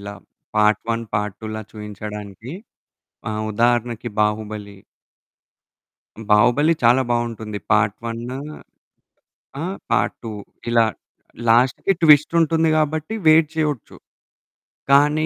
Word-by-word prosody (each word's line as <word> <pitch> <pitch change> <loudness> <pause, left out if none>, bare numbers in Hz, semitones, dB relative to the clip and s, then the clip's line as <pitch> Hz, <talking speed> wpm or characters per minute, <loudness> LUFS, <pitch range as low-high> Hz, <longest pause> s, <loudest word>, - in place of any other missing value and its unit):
ఇలా. 100 0 -7 0.4
Part 105 0 +3
one, 115 0 -2
part 105 -1 -2
టూలా 110 0 -5
చూయించడానికి. 105 +2 -8 0.8
ఆహ్, 110 0 -3
ఉదాహరణకి 120 0 0
'బాహుబలి.' 105 -2 -2 1.5
'బాహుబలి' 120 +10 +4
చాలా 120 +3 +5
బావుంటుంది. 115 -3 -2
పార్ట్ 105 -1 +2
వన్నూ 120 +3 -5 1.2
ఆహ్, 185 +4 -4
పార్ట్ - - +1
టూ 115 - -5 0.4
ఇలా 120 -1 +4 0.7
లాస్ట్‌కి 125 +11 +3
ట్విస్ట్ 150 -1 +6
ఉంటుంది 160 0 +2
కాబట్టి 155 +4 -1
వెయిట్ 155 0 +6
చేయొచ్చు. 150 -6 -2 1.0
కానీ, 150 +3 +4
115 Hz, 100 wpm, -21 LUFS, 105-145 Hz, 1.5 s, ట్విస్ట్